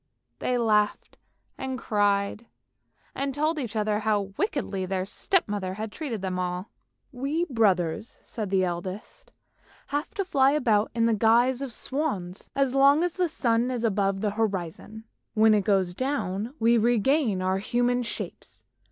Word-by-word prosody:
They 250 Hz, -, 0 dB
laughed 210 Hz, -3 st, +1 dB, 0.4 s
and 265 Hz, -1 st, -3 dB
cried, 205 Hz, 0 st, 0 dB, 0.7 s
and 275 Hz, -1 st, -3 dB
told 310 Hz, +2 st, 0 dB
each 235 Hz, -6 st, -5 dB
other 210 Hz, -1 st, +1 dB
how 210 Hz, -2 st, 0 dB
wickedly 215 Hz, -, -2 dB
their 185 Hz, 0 st, -1 dB
step 360 Hz, -, 0 dB
mother 195 Hz, -3 st, -3 dB
had 215 Hz, +1 st, -5 dB
treated 240 Hz, -, -5 dB
them 185 Hz, -1 st, -2 dB
all. 180 Hz, +2 st, -3 dB, 0.2 s
" -, -, -49 dB
We 280 Hz, +6 st, -1 dB
brothers," 215 Hz, -, 0 dB
said 215 Hz, -4 st, -5 dB
the 190 Hz, -1 st, +2 dB
eldest, 185 Hz, -, -5 dB, 0.3 s
" -, -, -29 dB
have 290 Hz, +2 st, -1 dB
to 395 Hz, -, -1 dB
fly 275 Hz, -5 st, +3 dB
about 225 Hz, -8 st, +2 dB
in 230 Hz, -1 st, +2 dB
the 230 Hz, -, +3 dB
guise 235 Hz, +4 st, +3 dB
of 275 Hz, -3 st, -4 dB
swans, 215 Hz, -, -3 dB
as 275 Hz, -2 st, +2 dB
long 280 Hz, +4 st, +5 dB
as 350 Hz, -1 st, 0 dB
the 365 Hz, -1 st, +1 dB
sun 235 Hz, -3 st, +1 dB
is 245 Hz, -2 st, -2 dB
above 195 Hz, -3 st, +1 dB
the 210 Hz, -2 st, 0 dB
horizon. 210 Hz, 0 st, -3 dB, 0.3 s
When 220 Hz, 0 st, +5 dB
it 205 Hz, -3 st, +2 dB
goes 190 Hz, -3 st, +2 dB
down 240 Hz, -1 st, -2 dB
we 230 Hz, -1 st, +4 dB
regain 235 Hz, -2 st, +2 dB
our 190 Hz, +1 st, +1 dB
human 245 Hz, +4 st, +1 dB
shapes. 235 Hz, -, -7 dB
220 Hz, 160 wpm, -26 LUFS, 200-265 Hz, 0.7 s, long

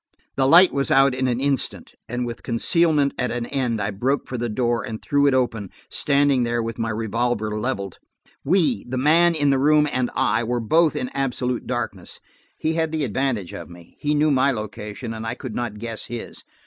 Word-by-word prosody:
The 135 Hz, -1 st, +2 dB
light 175 Hz, +5 st, +7 dB
was 140 Hz, -1 st, 0 dB
out 135 Hz, 0 st, +5 dB
in 130 Hz, 0 st, -1 dB
an 120 Hz, -1 st, 0 dB
instant, 140 Hz, -1 st, -1 dB, 0.2 s
and 120 Hz, +1 st, -2 dB
with 120 Hz, -1 st, -6 dB
concealment 145 Hz, +3 st, +2 dB
at 125 Hz, -, 0 dB
an 120 Hz, -1 st, -3 dB
end, 125 Hz, -4 st, -1 dB
I 100 Hz, +1 st, -1 dB
broke 130 Hz, +8 st, -1 dB
for 125 Hz, -, -5 dB
the 120 Hz, -1 st, -2 dB
door 120 Hz, +1 st, 0 dB
and 110 Hz, -4 st, -6 dB
threw 145 Hz, -2 st, +2 dB
it 135 Hz, -, +3 dB
open, 115 Hz, -6 st, -1 dB, 0.2 s
standing 140 Hz, -2 st, +2 dB
there 120 Hz, -1 st, 0 dB
with 115 Hz, +1 st, -5 dB
my 115 Hz, 0 st, -1 dB
revolver 110 Hz, 0 st, -1 dB
leveled. 105 Hz, -5 st, -3 dB, 0.4 s
We–the 135 Hz, -, +1 dB
man 165 Hz, +5 st, +4 dB
in 145 Hz, -2 st, +3 dB
the 135 Hz, -, +2 dB
room, 150 Hz, +2 st, +4 dB
and 125 Hz, -1 st, 0 dB
I–were 120 Hz, -1 st, +1 dB
both 160 Hz, +8 st, +2 dB
in 125 Hz, -, -2 dB
absolute 125 Hz, -2 st, -2 dB
darkness. 120 Hz, -1 st, -4 dB, 0.4 s
He 160 Hz, -, -1 dB
had 160 Hz, -1 st, -1 dB
the 160 Hz, -2 st, -1 dB
advantage 120 Hz, -5 st, -2 dB
of 85 Hz, -, -8 dB
me. 85 Hz, -1 st, -15 dB
He 150 Hz, 0 st, 0 dB
knew 150 Hz, +1 st, +3 dB
my 135 Hz, 0 st, +3 dB
location, 110 Hz, 0 st, -5 dB
and 110 Hz, 0 st, -6 dB
I 115 Hz, +2 st, -3 dB
could 130 Hz, -3 st, -7 dB
not 120 Hz, -3 st, -4 dB
guess 115 Hz, 0 st, -5 dB
his. 120 Hz, 0 st, -7 dB
125 Hz, 200 wpm, -22 LUFS, 115-140 Hz, 0.4 s, light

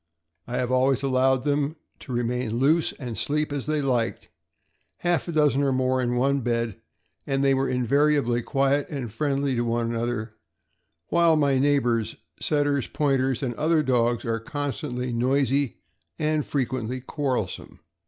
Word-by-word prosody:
I 120 Hz, -, -3 dB
have 125 Hz, 0 st, -1 dB
always 130 Hz, +1 st, +2 dB
allowed 130 Hz, -1 st, +2 dB
them 145 Hz, +1 st, 0 dB, 0.2 s
to -, -, -10 dB
re 120 Hz, 0 st, 0 dB
main 120 Hz, -1 st, -2 dB
loose 155 Hz, +6 st, +3 dB
and 125 Hz, -5 st, -6 dB
sleep 150 Hz, +3 st, -1 dB
as 140 Hz, -1 st, -4 dB
they 155 Hz, -1 st, 0 dB
liked, 120 Hz, -4 st, -1 dB, 0.7 s
half 175 Hz, 0 st, 0 dB
a -, -, -2 dB
dozen 150 Hz, -3 st, +3 dB
or 140 Hz, -1 st, +2 dB
more 130 Hz, 0 st, +1 dB
in 120 Hz, 0 st, 0 dB
one 140 Hz, +3 st, +2 dB
bed, 115 Hz, -3 st, -2 dB, 0.5 s
and 135 Hz, 0 st, 0 dB
they 135 Hz, 0 st, +4 dB
were 135 Hz, 0 st, +1 dB
invariably 130 Hz, 0 st, +2 dB
quiet 140 Hz, +3 st, +1 dB
and 130 Hz, -8 st, -5 dB
friendly 140 Hz, 0 st, 0 dB
to 120 Hz, -, 0 dB
one 115 Hz, 0 st, -1 dB
another, 115 Hz, -1 st, -2 dB, 0.8 s
while 170 Hz, -1 st, +4 dB
my 140 Hz, -3 st, +2 dB
neighbor's 125 Hz, -6 st, +1 dB, 0.2 s
Setters, 145 Hz, -3 st, +1 dB
Pointers, 135 Hz, -2 st, 0 dB
and 125 Hz, -2 st, -1 dB
other 155 Hz, +4 st, +2 dB
dogs 120 Hz, -3 st, +1 dB
are 115 Hz, -1 st, -1 dB
constantly 135 Hz, -2 st, -4 dB
noisy, 135 Hz, +1 st, +1 dB, 0.4 s
and 155 Hz, -1 st, 0 dB
frequently 130 Hz, -3 st, -2 dB
quarrel 130 Hz, -, -1 dB
some. -, -, -10 dB
135 Hz, 155 wpm, -25 LUFS, 120-145 Hz, 0.8 s, they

